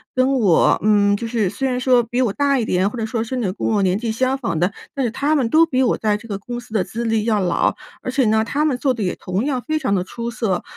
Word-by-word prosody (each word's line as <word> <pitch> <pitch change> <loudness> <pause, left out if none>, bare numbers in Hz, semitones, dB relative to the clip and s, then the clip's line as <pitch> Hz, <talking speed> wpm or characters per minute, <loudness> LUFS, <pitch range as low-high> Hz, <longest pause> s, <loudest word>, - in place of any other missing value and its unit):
跟 260 +1 +2
我 205 -10 +3
嗯 205 -1 +4
就 230 - -4
是 220 -5 0
虽 270 +6 -2
然 250 -1 -1
说 250 -2 +3
比 245 +3 -2
我 220 -6 +1
大 280 -2 +1
一 225 - -1
点， 185 +1 +1
或 245 - -8
者 220 - -1
说 225 0 -2
甚 250 +2 -4
至 215 - 0
有 185 - -2
跟 - - -5
我 210 -2 +1
年 185 0 +2
纪 225 0 -2
相 260 +4 0
仿 190 -11 -2
的， 180 +4 +1 0.2
但 270 -3 -1
是 225 - -1
他 290 +5 0
们 265 -6 +1
都 325 +4 +5
比 260 -4 0
我 245 - +1
在 210 -1 0
这 230 +2 -13
个 200 -2 -3
公 240 +4 -6
司 240 -2 -14
的 210 - +2
资 235 +1 -5
历 225 -1 +1
要 215 -2 +1
老， 175 -2 +1 0.3
而 255 - -4
且 265 -1 +2
呢， 220 0 +3
他 290 +6 -1
们 270 -5 +1
做 265 0 +1
得 225 -4 -4
也 180 - -1
同 190 +7 -3
样 260 -4 -1
非 310 0 0
常 260 -9 -1
地 180 - 0
出 235 +5 -6
色。 220 -6 -1
230 Hz, 325 characters per minute, -20 LUFS, 205-255 Hz, 0.3 s, 都